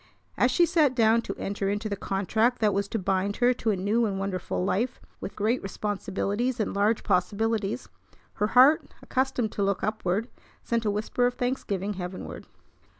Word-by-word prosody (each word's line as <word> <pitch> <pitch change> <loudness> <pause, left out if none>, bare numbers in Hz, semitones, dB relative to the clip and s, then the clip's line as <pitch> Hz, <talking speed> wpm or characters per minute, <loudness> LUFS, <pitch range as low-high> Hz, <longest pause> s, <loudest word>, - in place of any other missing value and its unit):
As 250 - +3
she 345 +7 +4
sat 315 -6 +3
down 225 -1 +4
to 195 - -5
enter 195 0 -2
into 205 +2 -2
the 200 - -2
contract 220 +5 0
that 210 -2 +2
was 200 +1 0
to 225 - -2
bind 195 +1 0
her 250 0 +3
to 235 -2 -2
a 210 - +2
new 210 +5 +1
and 195 -2 -2
wonderful 185 -2 -2
life 235 +7 -1 0.2
with - - -7
great 220 +5 0
responsibilities 205 +4 -2
and 215 - -1
large 210 +2 +2
possibilities, 210 +4 0 0.5
her 210 - +4
heart, 280 +5 +6
accustomed 255 -4 0
to 200 - -2
look 195 0 0
upward, 215 0 -1 0.4
sent 230 -1 -1
a - - +2
whisper 215 +4 0
of 245 - -3
thanksgiving 210 -6 -2
heavenward. 180 -1 -7
210 Hz, 175 wpm, -27 LUFS, 195-240 Hz, 0.5 s, heart